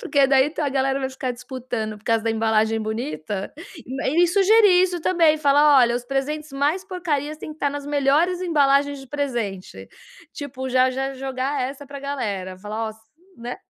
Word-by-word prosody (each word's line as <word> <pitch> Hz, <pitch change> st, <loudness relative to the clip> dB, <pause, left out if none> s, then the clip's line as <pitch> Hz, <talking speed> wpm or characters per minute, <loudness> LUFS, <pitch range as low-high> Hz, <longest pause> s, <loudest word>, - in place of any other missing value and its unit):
Porque 280 Hz, -1 st, +3 dB
daí 270 Hz, +2 st, +3 dB
a 290 Hz, -, +1 dB
galera 270 Hz, 0 st, 0 dB
vai 265 Hz, 0 st, -2 dB
ficar 260 Hz, -1 st, -4 dB
disputando 245 Hz, -3 st, -5 dB
por 205 Hz, -, -27 dB
causa 225 Hz, -1 st, +1 dB
da 225 Hz, -, +1 dB
embalagem 220 Hz, 0 st, +1 dB
bonita. 215 Hz, -, -4 dB, 0.5 s
E 340 Hz, +6 st, +3 dB
sugerir, 395 Hz, -1 st, +5 dB
isso 360 Hz, -2 st, -1 dB
também, 330 Hz, -2 st, +3 dB
falar: 290 Hz, -1 st, +5 dB
"Olha, 240 Hz, -1 st, +4 dB
os 245 Hz, -, -6 dB
presentes 280 Hz, +3 st, -3 dB
mais 295 Hz, +8 st, 0 dB
porcarias, 310 Hz, -6 st, -3 dB
têm 310 Hz, -, -7 dB
que 300 Hz, -, -19 dB
tá, 285 Hz, -, +1 dB
nas 285 Hz, 0 st, -6 dB
melhores 295 Hz, +5 st, +2 dB
embalagens 285 Hz, -4 st, +2 dB
de 270 Hz, -, -12 dB
presente". 240 Hz, -10 st, -4 dB, 0.4 s
Tipo, 260 Hz, -2 st, -6 dB
já 255 Hz, 0 st, +3 dB
já 270 Hz, +1 st, -3 dB
jogar 265 Hz, +1 st, -3 dB
essa 275 Hz, +3 st, -5 dB
pra 280 Hz, 0 st, -8 dB
galera, 205 Hz, -10 st, -4 dB
falar: 215 Hz, +3 st, -4 dB
"Ó -, -, -3 dB
s" 220 Hz, -, -15 dB, 0.4 s
né? 240 Hz, +1 st, -6 dB
275 Hz, 180 wpm, -22 LUFS, 240-295 Hz, 0.5 s, sugerir